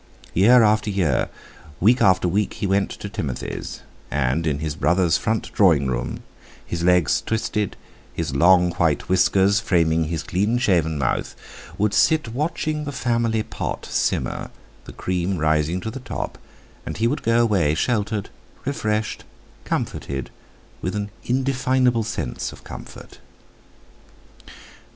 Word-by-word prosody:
Year 115 +6 +6
after 110 0 +3
year, 90 -10 +1 0.5
week 120 +7 +4
after 95 -2 +4
week, 100 +4 0
he - - -3
went 100 0 +1
to - - -7
Timothy's, 90 - -5 0.3
and 75 +3 0
in 75 -2 +1
his 75 0 -3
brother's 85 +2 +2
front 110 0 -1
drawing 80 -9 +4
room—his 65 +6 -5
legs 90 -3 +3
twisted, 105 -2 -2 0.3
his 65 - -3
long 90 +4 +5
white - - +1
whiskers 95 +2 +4
framing 80 -3 +2
his 80 -1 -3
clean 105 +6 0
shaven 85 -10 +2
mouth—would 95 +9 -3
sit 155 -6 +3
watching 150 +3 -2
the 145 - -3
family 115 -4 0
pot - - -5
simmer, - - -1 0.4
the - - -9
cream 90 +1 -2
rising 80 +2 +1
to 110 - -4
the 135 - -7
top; 130 - -5 0.4
and - - -6
he 110 - +1
would 120 - 0
go 115 +1 +2
away 95 -10 +2
sheltered, 105 +1 -1 0.3
refreshed, 110 -6 -2 0.4
comforted, 70 -2 -3 0.5
with 90 - -3
an 105 0 -3
indefinable 130 -2 +1
sense 105 - -4
of - - -14
comfort. - - -11
100 Hz, 130 wpm, -22 LUFS, 80-115 Hz, 0.5 s, Year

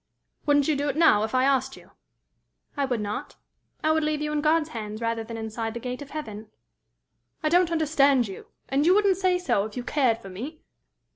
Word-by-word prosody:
"Wouldn't 290 -1 +4
you 310 - +2
do 285 +1 -1
it 275 - -2
now, 315 -10 +5
if 220 +3 -2
I 255 - +3
asked 265 -1 +1
you?" - - -17 0.8
"I 285 -2 0
would 245 -4 -1
not. 210 0 -5 0.5
I 310 - +3
would 315 0 +2
leave 305 0 0
you 300 0 -2
in 300 -1 0
God's 315 +1 +2
hands 215 -4 -6
rather 230 -1 -1
than 225 +1 -7
inside 225 0 -4
the - - -3
gate 250 +3 -5
of 285 - -9
heaven." 220 -8 -7 0.9
"I 310 - +2
don't 350 +1 +3
understand 285 -6 +3
you. 195 - -9 0.2
And 275 +2 +1
you 365 - +6
wouldn't 400 -3 +3
say 370 -1 +2
so 360 - +1
if 215 +3 -9
you 245 - -3
cared 255 -4 +1
for 195 -4 -11
me! 260 - -8
275 Hz, 215 wpm, -26 LUFS, 225-310 Hz, 0.9 s, you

